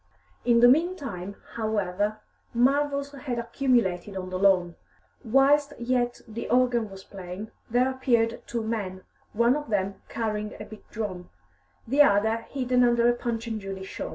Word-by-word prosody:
In 235 -1 +4
the 245 - +9
meantime, 265 - +1 0.2
however, 210 -1 -1 0.3
marvels 280 +3 +2
had 270 -3 -5
accumulated 230 -6 0
on 185 0 -5
the 185 - -2
lawn. 185 -3 +3 0.5
Whilst 280 +4 +4
yet 245 0 -1
the 225 +1 -6
organ 245 -3 +2
was 195 0 -11
playing, 190 +2 -8 0.2
there 250 +3 +2
appeared 235 -3 +1
two 235 -1 -2
men, 200 -5 -3 0.3
one 235 +4 +3
of 295 -3 -5
them 195 -2 -1
carrying 215 -2 -3
a 210 - -6
big 215 0 -13
drum, 190 -5 -5 0.6
the 275 +5 +4
other 220 -3 +4
hidden 250 -2 +1
under 235 -1 +4
a 240 - +5
Punch 235 -1 -3
and 220 -2 -4
Judy 195 -1 -6
show. 190 - -6
230 Hz, 155 wpm, -26 LUFS, 200-250 Hz, 0.6 s, the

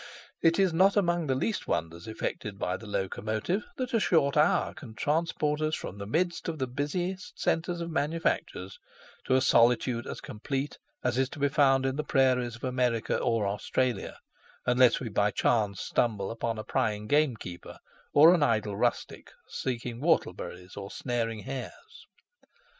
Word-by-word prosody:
It 165 0 +4
is 190 -4 +3
not 190 +5 +4
among 175 -4 +1
the 130 - +1
least 210 +11 -2
wonders 85 +3 -3
effected 105 -2 -4
by 90 -2 -1
the 110 - -9
locomotive 110 - -2
that 255 -1 -3
a 230 - +4
short 160 -8 +2
hour 150 +3 +3
can 130 -10 -11
transport 150 0 0
us 155 0 +1
from 100 - -7
the 100 - -6
midst 170 - -1
of 160 - -4
the 130 - -1
busiest 175 +9 -4
centres 170 +1 0
of 170 0 -4
manufactures 160 - -1 0.5
to 130 - +2
a 130 - +4
solitude 120 0 +3
as - - -5
complete 135 +6 -4 0.2
as 125 0 +1
is 130 -1 +1
to - - -10
be 145 0 +2
found 135 -2 +3
in 135 +1 -1
the 150 - -1
prairies 130 -4 +2
of 120 - -15
America 125 -3 0
or 115 -4 +1
Australia, 105 +3 -1 0.5
unless 125 -1 +4
we 130 - -5
by 105 -1 +2
chance 105 -2 +1
stumble 105 -5 0
upon 115 0 -2
a 110 - -4
prying 105 -1 -1
gamekeeper 115 - -1 0.3
or 160 +4 +8
an 175 - +2
idle 110 -6 +1
rustic - - -2 0.2
seeking 120 -1 -4
whortle 160 - +2
berries 90 +1 -9
or 100 -1 -6
snaring 115 -3 -2
hares. 135 - -8
130 Hz, 165 wpm, -29 LUFS, 110-155 Hz, 0.5 s, or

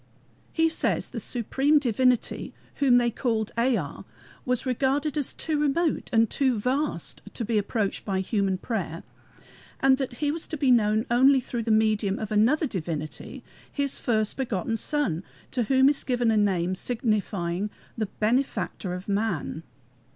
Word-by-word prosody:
He 325 0 +3
says 325 - 0
the - - -5
supreme 270 +5 +1
divinity, 250 -2 +1 0.2
whom 265 -4 +5
they 240 -1 +2
called 225 -2 -1
EA, 230 - 0 0.5
was 250 0 0
regarded 270 +4 0
as 290 -3 0
too 310 -2 -2
remote 300 +3 0
and 225 -1 +4
too 260 0 +1
vast 255 - -2
to 235 - -3
be 220 -1 +1
approached 205 0 -2
by 195 -2 -1
human 195 -1 0
prayer, 185 -6 -4 0.8
and 265 0 +4
that 260 -2 -3
he 290 +4 -1
was 325 +1 -4
to 310 - -4
be 270 -2 +3
known 215 -1 +3
only 265 +3 +6
through 240 -1 -4
the 225 - -4
medium 215 -2 +2
of 215 -1 -5
another 235 +10 +3
divinity, 160 - -5 0.3
his 280 -2 -1
first 215 -3 0
begotten 225 -5 -1
Son, 225 - -1 0.3
to 245 -3 0
whom 265 +2 +4
is 285 0 +2
given 245 -3 +1
a - - +2
name 185 -3 +1
signifying 205 -4 -1 0.3
the 215 -2 -2
Benefactor 215 -4 -1
of 180 +1 -8
Man. 200 -6 -1
235 Hz, 155 wpm, -26 LUFS, 205-265 Hz, 0.8 s, only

